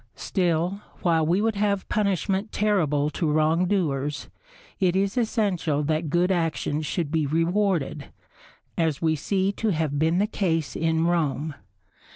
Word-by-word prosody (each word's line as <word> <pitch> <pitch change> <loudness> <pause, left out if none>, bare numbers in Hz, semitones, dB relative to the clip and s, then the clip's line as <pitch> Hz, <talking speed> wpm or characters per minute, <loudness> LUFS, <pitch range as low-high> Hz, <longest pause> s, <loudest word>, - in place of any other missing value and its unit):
Still, 180 +2 -1 0.2
while 165 -2 +3
we 180 +5 +2
would 225 +1 +1
have 200 -1 0
punishment 195 0 0
terrible 155 -9 +1
to 160 -1 -1
wrongdoers, 155 -2 0 0.5
it 185 -2 +2
is 195 +2 +1
essential 200 - 0
that 155 +1 -1
good 175 +4 +2
actions 155 -3 -1
should 165 -3 -2
be 160 -3 +1
rewarded, 165 -2 0 0.7
as 160 -4 +1
we 160 -1 +1
see 190 +5 0
to 220 +2 -2
have 155 -5 -1
been 160 +3 +2
the 200 - +3
case 165 -8 -1
in 160 0 +1
Rome. 155 -3 0
170 Hz, 140 wpm, -25 LUFS, 155-195 Hz, 0.7 s, while